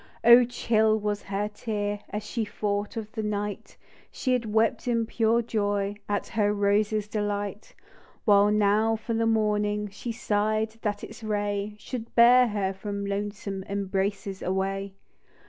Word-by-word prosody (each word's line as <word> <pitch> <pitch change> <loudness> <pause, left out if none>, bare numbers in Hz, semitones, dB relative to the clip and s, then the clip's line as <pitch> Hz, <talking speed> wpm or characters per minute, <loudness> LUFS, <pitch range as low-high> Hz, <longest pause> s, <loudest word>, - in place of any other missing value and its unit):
Oh! 240 +1 +8
chill 220 -2 +2
was 210 -1 -2
her 200 +1 -2
tear, 205 -1 -3
As 210 +1 -4
she 225 +2 -2
thought 205 +1 -3
of 215 -1 -5
the 220 - -4
night 210 -1 -4 0.3
She 255 - -1
had 230 -4 -1
wept 225 +3 +1
in 230 -2 +1
pure 230 +1 +1
joy 205 -3 -1 0.2
At 205 0 -1
her 210 -2 +1
rose's 210 +1 +1
delight; 205 -1 -3 0.5
While 205 -1 +5
now 210 +2 +3
for 225 +1 -4
the 225 0 +1
morning 210 -1 +1
She 230 +4 -5
sigh'd; 215 0 -1
— - - -44
that 205 -1 -2
its 220 +1 -9
ray 205 -1 -2
Should 230 +1 -7
bear 245 +1 +7
her 200 -3 -1
from 200 +1 -5
loathsome 200 -1 -4
Embraces 195 0 -2
awav. 195 +1 -2
210 Hz, 150 wpm, -27 LUFS, 205-220 Hz, 0.5 s, Oh